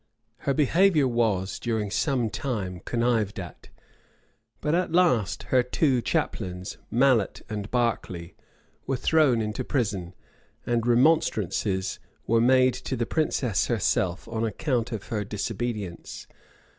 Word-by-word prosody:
Her - - +4
behavior 155 0 +4
was, 110 -6 0
during 110 -4 -2
some 125 -4 0
time, 100 -9 -3
connived 115 -4 0
at; 90 -3 -9 0.9
but 150 - -1
at 180 0 +1
last 165 - +2
her 130 - +6
two 125 +1 +1
chaplains, 90 -4 -2
Mallet 125 -4 +2
and 105 -1 -4
Berkeley, 95 -8 -1 0.5
were 135 - 0
thrown 140 -4 +3
into 110 +4 -3
prison;[] 100 -10 -2 0.5
and 120 -1 0
remonstrances 110 - +2 0.3
were 115 +1 +3
made 130 +1 +5
to 130 - -4
the 120 -1 -1
princess 125 - 0
herself 90 0 0
on 115 -1 -3
account 115 +2 -1
of 110 -4 -6
her 105 -2 -1
disobedience. 105 -2 -4
115 Hz, 120 wpm, -26 LUFS, 100-130 Hz, 0.9 s, her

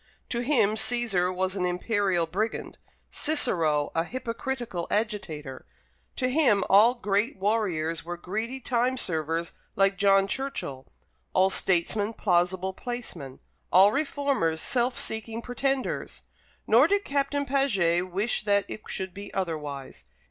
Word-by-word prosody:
To 235 - -1
him 240 -5 +3
Cæsar 220 -6 +1
was 185 +1 -1
an 185 - -1
imperial 180 -1 +1
brigand, 205 +7 -3 0.3
Cicero 165 - +1
a 165 - +1
hypocritical 240 -3 -4
agitator. 165 - -3 0.5
To 255 - 0
him 250 -8 +3
all 220 +5 +7
great 210 +1 0
warriors 185 -6 0
were 175 +1 -5
greedy 220 +9 -4
time 250 +1 0
servers 165 - -2 0.2
like 195 0 +2
John 195 -1 +5
Churchill; 195 - -4 0.5
all 190 +1 +4
statesmen 205 +5 +1
plausible 185 -1 +1
placemen; 185 - -6 0.3
all 195 +3 +7
reformers 275 - 0
self 245 +5 0
seeking 220 +1 -3
pretenders. 260 +2 -2 0.4
Nor 245 +7 +6
did 405 +2 +1
Captain 285 0 0
Paget 190 -11 +1
wish 200 +6 0
that 200 -1 +2
it 215 - -7
should 190 -2 -4
be 200 +1 -8
otherwise. 150 -7 -4
200 Hz, 125 wpm, -27 LUFS, 175-245 Hz, 0.5 s, all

